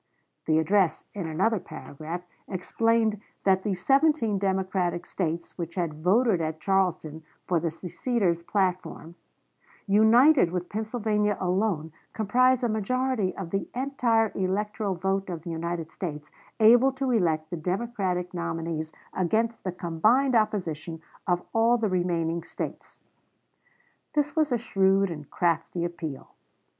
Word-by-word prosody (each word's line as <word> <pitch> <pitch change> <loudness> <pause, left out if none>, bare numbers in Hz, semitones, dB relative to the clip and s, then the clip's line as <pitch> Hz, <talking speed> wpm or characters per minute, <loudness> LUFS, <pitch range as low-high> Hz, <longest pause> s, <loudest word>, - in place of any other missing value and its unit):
The 155 -1 +3
address, 170 0 +2
in 190 -5 -4
another 195 +7 +1
paragraph, 160 +2 -7 0.2
explained 220 +3 +1 0.2
that 190 -1 +3
the 195 -1 -1
seventeen 270 - +2
Democratic 185 -2 -1
States 170 -2 -3
which 170 -1 -5
had 160 -4 -3
voted 200 +1 +3
at 155 0 -3
Charleston 175 -4 0 0.2
for 175 -2 +1
the 165 - -1
seceders' 180 +2 -1
platform, 180 -2 -2 0.7
"united 220 - +5
with 180 0 -4
Pennsylvania 215 -1 0
alone, 180 -3 0 0.2
comprise 250 +4 +3
a - - +3
majority 225 -1 -1
of 180 -4 -6
the 195 - -2
entire 245 -4 +1
electoral 200 +1 -1
vote 195 +2 -1
of 170 -3 -5
the 170 - -5
United 165 0 -4
States, 150 -5 -6 0.3
able 240 +4 +6
to 265 -1 -1
elect 165 -7 +1
the 175 - -3
Democratic 185 0 -2
nominees 165 -2 -3 0.2
against 220 +5 0
the 185 - -2
combined 215 +11 +2
opposition 175 -8 0 0.3
of 180 -1 +1
all 230 +2 +4
the 225 -3 0
remaining 170 -2 0
States." - - -7 1.2
This 295 -1 +1
was 310 -3 +2
a 245 - +3
shrewd 195 -4 +2
and 150 -3 -8
crafty 170 0 0
appeal. 165 -5 -6
190 Hz, 130 wpm, -27 LUFS, 170-220 Hz, 1.2 s, able